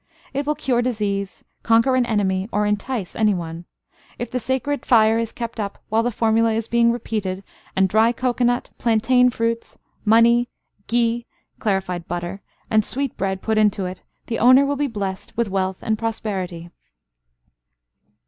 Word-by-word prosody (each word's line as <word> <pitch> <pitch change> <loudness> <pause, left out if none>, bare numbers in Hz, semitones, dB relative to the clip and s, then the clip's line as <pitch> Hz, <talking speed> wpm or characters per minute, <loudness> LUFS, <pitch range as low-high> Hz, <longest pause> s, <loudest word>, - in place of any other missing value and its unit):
It 280 +1 -2
will 300 - +1
cure 265 -5 0
disease, 205 -5 -2 0.2
conquer 230 +3 +3
an 250 -2 +2
enemy, 195 -2 0
or 210 0 +1
entice 210 0 -2
any 215 -3 +3
one. 170 0 -6 0.5
If 240 -1 -5
the 250 - -1
sacred 260 +4 -2
fire 225 -2 +4
is 230 -1 -2
kept 235 -1 -6
up 200 -2 -3
while 220 +1 +2
the 240 - 0
formula 225 0 +2
is 225 0 -2
being 235 0 +3
repeated, 205 -5 -3 0.3
and 190 0 +4
dry 220 +4 +4
cocoanut, 245 0 0
plantain 250 +2 +3
fruits, 230 -1 -2 0.3
money, 235 +2 +4 0.4
ghi 235 0 +1 0.3
(clarified 190 -4 -1
butter), 175 +3 -4 0.3
and 215 -1 +3
sweet 275 +3 -2
bread 190 0 -2
put 220 -1 +1
into 205 -2 +2
it, 180 0 -6 0.2
the 230 - -3
owner 255 +4 +6
will 285 +1 0
be 285 +1 0
blessed 200 -6 -5
with 235 -4 0
wealth 190 -1 -2
and 220 -1 0
prosperity. 190 -7 -4
225 Hz, 160 wpm, -22 LUFS, 195-240 Hz, 0.5 s, owner